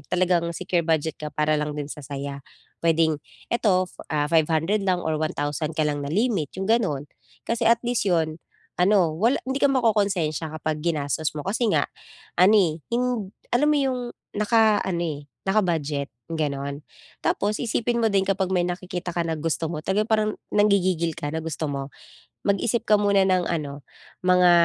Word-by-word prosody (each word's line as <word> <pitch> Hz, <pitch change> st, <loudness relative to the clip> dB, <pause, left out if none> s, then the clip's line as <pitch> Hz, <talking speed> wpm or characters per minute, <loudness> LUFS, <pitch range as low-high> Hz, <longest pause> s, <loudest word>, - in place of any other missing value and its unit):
talagang 175 Hz, -2 st, +2 dB
secure 180 Hz, 0 st, 0 dB
budget 160 Hz, -1 st, 0 dB
ka 150 Hz, -, -4 dB
para 150 Hz, 0 st, +2 dB
lang 150 Hz, 0 st, -3 dB
din 145 Hz, 0 st, -4 dB
sa 150 Hz, -, -7 dB
saya. 140 Hz, 0 st, -6 dB, 0.4 s
Puwedeng 160 Hz, -2 st, +2 dB, 0.3 s
eto, 195 Hz, -6 st, +3 dB, 0.2 s
ah, 150 Hz, -1 st, 0 dB
fo -, -, -10 dB
500 165 Hz, +6 st, +1 dB
lang 180 Hz, -1 st, +1 dB
or 155 Hz, -1 st, -1 dB
1,000 155 Hz, 0 st, -2 dB
ka 155 Hz, -, +1 dB
lang 150 Hz, -1 st, 0 dB
na 140 Hz, -, -4 dB
limit, 195 Hz, -, +1 dB
'yong 190 Hz, +2 st, -2 dB
gano'n, 185 Hz, -, +1 dB, 0.4 s
kasi 230 Hz, 0 st, 0 dB
at 230 Hz, 0 st, +4 dB
least 240 Hz, -3 st, 0 dB
'yon, 160 Hz, -3 st, +1 dB, 0.4 s
ano, 180 Hz, -3 st, +4 dB
wala 230 Hz, -, +2 dB
hindi 265 Hz, +1 st, -2 dB
ka 280 Hz, -, +5 dB
makokonsensya 200 Hz, -, +1 dB
kapag 155 Hz, 0 st, -2 dB
ginastos 150 Hz, -2 st, -1 dB
mo 150 Hz, -, -3 dB
kasi 225 Hz, +4 st, 0 dB
nga -, -, +3 dB, 0.5 s
ano, 185 Hz, +4 st, +6 dB
eh, 165 Hz, -5 st, +2 dB
hind 235 Hz, -5 st, -1 dB, 0.2 s
alam 250 Hz, +5 st, +3 dB
mo 300 Hz, -, +4 dB
'yong 265 Hz, -3 st, +1 dB, 0.4 s
naka-ano, 210 Hz, -5 st, +3 dB
eh, 150 Hz, -4 st, -3 dB, 0.3 s
naka-budget, 155 Hz, -8 st, 0 dB, 0.2 s
gano'n. 140 Hz, -3 st, -3 dB, 0.4 s
Tapos 210 Hz, +1 st, +1 dB
isipin 235 Hz, 0 st, 0 dB
mo 225 Hz, -, +3 dB
din 195 Hz, -1 st, +2 dB
kapag 190 Hz, -1 st, 0 dB
may 175 Hz, -1 st, +2 dB
nakikita 180 Hz, 0 st, -4 dB
ka 170 Hz, -, +1 dB
na 160 Hz, -1 st, -2 dB
gusto 160 Hz, +1 st, -1 dB
mo 165 Hz, -, -3 dB
talaga, 190 Hz, +6 st, +1 dB
parang 215 Hz, -1 st, +1 dB, 0.2 s
nanggigigil 185 Hz, -5 st, +2 dB
ka 145 Hz, -, -3 dB
na 160 Hz, -, -1 dB
gusto 160 Hz, -1 st, -3 dB
mo, 140 Hz, -1 st, -4 dB, 0.6 s
mag-isip 205 Hz, +3 st, +1 dB
ka 210 Hz, -2 st, +4 dB
muna 200 Hz, -1 st, +3 dB
ng 185 Hz, -1 st, +2 dB
ano, 145 Hz, -4 st, -4 dB, 0.4 s
mga, 180 Hz, -1 st, +6 dB
175 Hz, 175 wpm, -24 LUFS, 155-210 Hz, 0.6 s, ano